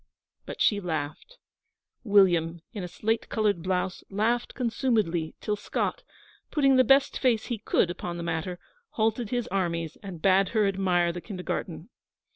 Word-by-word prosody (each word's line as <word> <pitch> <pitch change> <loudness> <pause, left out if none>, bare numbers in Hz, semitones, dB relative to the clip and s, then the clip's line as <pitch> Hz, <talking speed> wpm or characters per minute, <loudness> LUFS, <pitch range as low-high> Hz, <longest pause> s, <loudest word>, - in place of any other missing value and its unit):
But - - -7
she 205 - +4
laughed 160 - -4 0.7
William, 175 -6 +3
in 205 -5 -5
a - - -4
slate 220 +5 -2
coloured 210 -6 +1
blouse, 185 +1 -2
laughed 225 +4 0
consumedly 220 -10 0
till 210 - -1
Scott, 205 - -2 0.5
putting 275 -3 +3
the 255 - +6
best 270 +1 +4
face 235 -5 +2
he 235 -4 -3
could 185 -4 +1
upon 175 -1 -5
the 170 - -4
matter, 170 +2 -3 0.4
halted 220 0 +1
his 245 -1 -1
armies 170 -4 -2
and 190 -4 -8
bade 190 +2 +4
her 210 -2 +4
admire 180 -3 +1
the 175 - -6
kindergarten. 180 -2 -5
195 Hz, 150 wpm, -27 LUFS, 175-225 Hz, 0.7 s, the